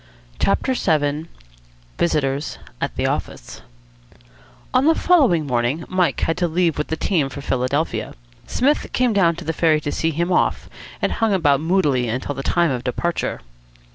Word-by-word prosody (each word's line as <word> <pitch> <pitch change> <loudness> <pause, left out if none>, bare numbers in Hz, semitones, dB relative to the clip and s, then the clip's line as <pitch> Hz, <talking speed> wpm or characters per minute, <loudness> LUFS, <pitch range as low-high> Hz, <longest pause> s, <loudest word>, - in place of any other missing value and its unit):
CHAPTER 260 +6 +1
VII 155 - 0 0.7
VISITORS 145 -3 0 0.2
AT - - -2
THE - - -1
OFFICE - - -4 1.1
On 255 +2 +3
the 325 +1 +5
following 260 - +3
morning 125 +5 -1
Mike 185 -2 0
had 165 - 0
to 180 -1 +1
leave 165 -2 0
with 150 - -1
the 160 - -3
team 155 -8 0
for 140 - -8
Philadelphia. 135 +4 -1 0.3
Psmith 285 +4 +1
came 250 -3 +2
down 170 -5 +3
to 170 +1 -9
the 160 - -1
ferry 155 -1 +3
to 145 - -3
see 160 - 0
him 170 +3 -1
off, - - +1 0.4
and - - +2
hung 225 -3 +1
about 145 -6 +2
moodily 155 -8 +1
until 130 +5 -3
the 135 - -5
time 170 +2 +1
of 125 -2 -3
departure. 170 +7 -2
160 Hz, 165 wpm, -21 LUFS, 145-180 Hz, 1.1 s, the